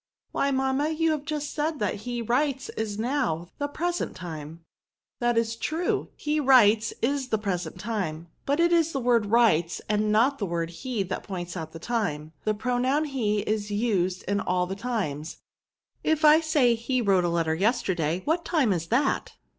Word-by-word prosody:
" - - -53
Why, 280 - +1
mamma, 265 +2 +1
you 320 0 +1
have 300 -2 -2
just 295 -1 -3
said 310 +1 -1
that 205 -3 -1
ke 240 0 -4
writes 265 +2 0
is 215 -2 -4
now^ 225 - -1
the 285 - 0
present 345 +4 -2
time." 165 -2 -8 0.3
*' - - -67
That 240 -1 +1
is 230 0 +1
true; 320 +9 -1
he 300 +1 -1
writes 230 -5 +5
is 275 +1 0
the 220 - +1
present 195 -4 -3
VERBS. - - -10
S13 - - -10
time; 175 -8 -3 0.2
but 285 +3 +1
it 340 0 +4
is 330 -1 +3
the 275 - -1
word 235 -4 +2
writes, 200 -7 +3
and 210 0 +1
not 245 +6 +3
the 200 - -1
word 170 -1 -2
he, 225 +4 -3
that 185 0 -4
points 175 -3 -6
out 160 -3 -5
the 165 - -8
time. 165 -7 -2
The 215 0 +1
pro 245 +3 -1
noun 275 +5 +2
he 220 -8 0
is 210 0 -2
used 200 -4 0
in 200 +1 0
all 180 -1 0
the 190 +2 -5
times. 195 -10 -3 0.7
If 315 0 +2
I 305 +1 +8
say» 300 -7 +3
he 235 +3 -1
wrote 195 -5 +3
a 175 - +1
letter 165 -2 +1
yesterday, 185 -4 0
what 330 +3 +1
time 280 - +2
is 165 -2 -3
that?" 270 +7 0
230 Hz, 200 wpm, -26 LUFS, 185-275 Hz, 0.7 s, I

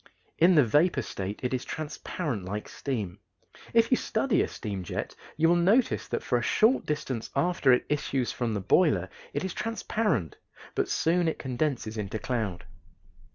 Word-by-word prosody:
In 175 +2 +6
the 150 -4 +6
vapor 150 +10 +3
state 95 +2 -5
it 125 - -1
is 125 - -1
transparent 150 - -4
like 105 +3 -4
steam. 110 -10 -4 0.5
If 230 +1 +3
you 255 - +5
study 220 +1 +1
a - - +1
steam 100 -4 -5
jet - - -4 0.2
you 160 +1 +4
will 170 - +5
notice 200 +9 +3
that - - -3
for 125 - +1
a - - -3
short 220 - +3
distance 135 -6 -3
after 140 -2 +3
it 125 - +3
issues 135 -4 -1
from 115 -3 -2
the 100 - -2
boiler 100 - +3 0.2
it - - -2
is 190 - -3
transparent, 210 - -1 0.4
but - - 0
soon 170 +1 +2
it 160 - 0
condenses 125 -4 -2
into 105 +1 -3
cloud. 110 -8 -3
135 Hz, 170 wpm, -28 LUFS, 110-175 Hz, 0.5 s, In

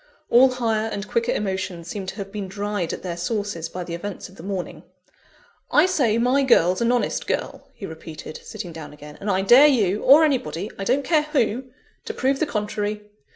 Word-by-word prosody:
All 255 +3 +7
higher 225 -3 0
and 200 -1 -5
quicker 235 +1 0
emotions 190 -4 -3
seemed 190 +1 -5
to - - -7
have 195 -2 -7
been 205 -2 -5
dried 200 -2 -3
at - - -6
their 175 -2 -3
sources 175 -2 -3
by 180 - -5
the 170 - -7
events 190 +3 -6
of 190 - -17
the - - -11
morning. 190 0 -5 0.9
"I - - +5
say 270 -12 +2
my 250 +4 +3
girl's 185 -8 +3
an 235 +1 +3
honest 245 -1 -1
girl," - - -3
he 200 - -7
repeated, 160 -2 -9
sitting 175 - -7
down 160 -2 -9
again; 150 0 -12
"and 205 - -3
I 190 -1 +1
dare 250 +9 +8
you, 215 -8 +2
or 290 +5 +7
anybody 210 - -1
I 195 - -3
don't 270 +6 +1
care 315 -3 +3
who 265 -5 0 0.4
to - - -5
prove 270 +1 +1
the 315 - +1
contrary. 210 -1 -3
205 Hz, 200 wpm, -23 LUFS, 185-245 Hz, 0.9 s, dare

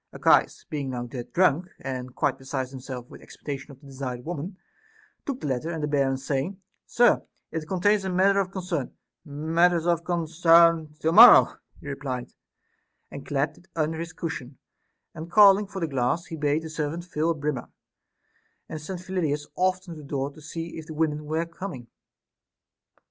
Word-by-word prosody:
Ar - - -9
chias - - +3
being 145 -3 -4
now 120 -1 -4
dead 120 0 -8
drunk, 175 -1 +3
and 130 -1 -6
quite 135 -1 0
beside 135 -1 -3
himself 130 -2 -8
with - - -13
expectation 140 -1 -7
of 140 -2 -13
the 145 - -19
desired 130 -3 -6
women, 175 +3 -5 0.7
took 270 -2 -3
the - - -5
letter; 135 +3 -2
and 160 -3 -4
the - - 0
bearer 135 -2 +1
saying, 140 +8 -3 0.2
" - - -55
Sir, 240 -1 +5 0.3
it 160 -1 -4
contains 195 +3 +2
matter 195 +2 +3
of 190 -2 0
concern," 180 -7 -4 0.3
" - - -58
Matters 165 +3 +1
of 170 -1 +1
concern 165 -2 +3
to 160 - +2
morrow," - - +9 0.3
he - - -12
replied, 135 -3 -4 0.8
and 140 - -8
clapped 140 +1 -1
it 185 - -24
under 160 0 -1
his 165 0 -5
cushion; 140 -7 -6 0.6
and 160 +2 -8
calling 200 +1 +6
for 195 -1 -6
the 165 - -1
glass, 135 +5 0
he 165 - -7
bade 150 +1 0
the 160 - -6
servant 160 +3 -3
till 155 +2 0
a 165 - +1
brimmer, 145 -3 -3 1.0
and 155 - -6
sent 180 +3 -6
Phyllidas 160 -6 -2
often 185 -1 0
to 155 - -10
the - - -13
door 140 0 -2
to 155 - -15
see 165 +2 -6
if 155 - -10
the 155 - -8
women 150 -1 -1
were 160 +2 -1
coming. 170 -6 -7
155 Hz, 180 wpm, -26 LUFS, 140-175 Hz, 1.0 s, morrow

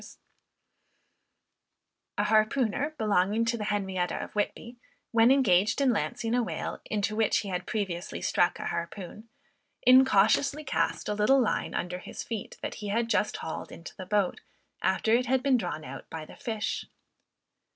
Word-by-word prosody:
A - - +2
harpooner 235 +6 +1
belonging 210 +1 +2
to 230 +1 0
the 215 -2 -4
Henrietta 190 -4 -1
of - - -5
Whitby, 235 +3 -3 0.3
when 230 0 +5
engaged 210 -7 +3
in 270 -3 +3
lancing 230 +2 -2
a 245 - +3
whale, 230 - -4
into 210 0 -1
which 220 -1 +2
he 200 - -6
had 180 -1 -3
previously 190 -6 -3
struck 175 - +1
a - - -6
harpoon, 190 +5 -5 0.5
incautiously 260 +3 +5
cast - - -1
a 210 - 0
little 210 +6 +4
line 240 - 0
under 180 +1 -3
his - - -7
feet 225 -4 -6
that - - -3
he 210 - -4
had 230 +3 0
just 210 -1 +1
hauled 160 - -6
into 165 - -10
the 185 - -8
boat, 205 -2 0 0.4
after 190 +4 +1
it 245 +1 +3
had 260 0 +2
been 275 -2 +4
drawn 155 -8 -4
out - - -9
by 160 -1 -6
the - - -13
fish. 225 -6 -3
215 Hz, 160 wpm, -28 LUFS, 190-240 Hz, 0.5 s, when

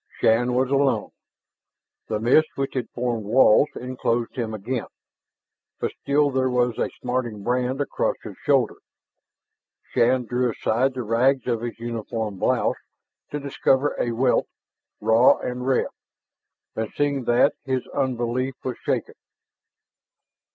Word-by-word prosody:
Shann 120 +2 +3
was 130 +1 +1
alone. 140 -1 +1 1.0
The 105 -1 -1
mist, 130 +8 +4
which 135 0 -2
had 125 -3 -3
formed 120 -2 -2
walls, 120 +5 +5
enclosed 120 -1 -2
him 115 -4 -2
again. 110 +4 -3 0.9
But - - -1
still 145 0 +2
there 130 0 +1
was 125 -2 +1
a - - 0
smarting 125 -5 -2
brand 125 +3 0
across 145 - 0
his - - -8
shoulder. - - +2 1.2
Shann 125 +1 +3
drew 125 +1 0
aside 125 +4 0
the 125 - -3
rags 125 +4 +2
of 120 -3 -1
his 120 -1 -5
uniform 115 -3 -4
blouse - - +1 0.5
to 145 - -3
discover 140 0 +1
a 120 - 0
welt, 125 +2 +2 0.5
raw 110 +3 +5
and 125 +1 -4
red. 135 - +2 0.9
And 110 -1 -3
seeing 140 -3 0
that, 120 +2 +4
his 130 -2 -2
unbelief 130 0 -1
was 130 - -3
shaken. - - -2
125 Hz, 130 wpm, -24 LUFS, 115-130 Hz, 1.2 s, walls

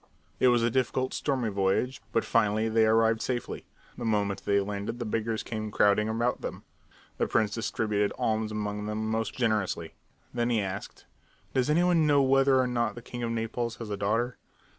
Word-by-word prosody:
It - - +5
was 120 -2 +4
a 115 - +2
difficult, 130 +1 0
stormy 130 -6 -1
voyage, 100 +6 0
but 115 - +1
finally 110 -1 +2
they 110 0 +4
arrived 115 0 +3
safely. 125 -2 -3 0.3
The - - -4
moment 105 -3 0
they 100 0 +3
landed 100 +3 -3
the 120 - -4
beggars 110 0 -2
came 110 -2 -4
crowding 105 +1 +3
about 120 +2 0
them. - - -6 0.6
The - - +2
prince 105 -2 +1
distributed 105 -2 0
alms 110 -1 0
among 105 -1 -3
them 110 +1 -2
most 110 -1 -1
generously. 105 -9 -1 0.4
Then 120 0 0
he 115 -2 +2
asked: 95 0 -5 0.5
"Does 130 +1 +1
any 165 +4 +4
one 170 -3 +3
know 145 -2 +5
whether 135 0 +4
or 130 - +3
not 120 -1 -1
the 120 - -9
king 120 0 -7
of 120 - -1
Naples 115 +1 -2
has 115 -3 -7
a - - 0
daughter?" 115 +5 -1
115 Hz, 185 wpm, -28 LUFS, 105-120 Hz, 0.6 s, It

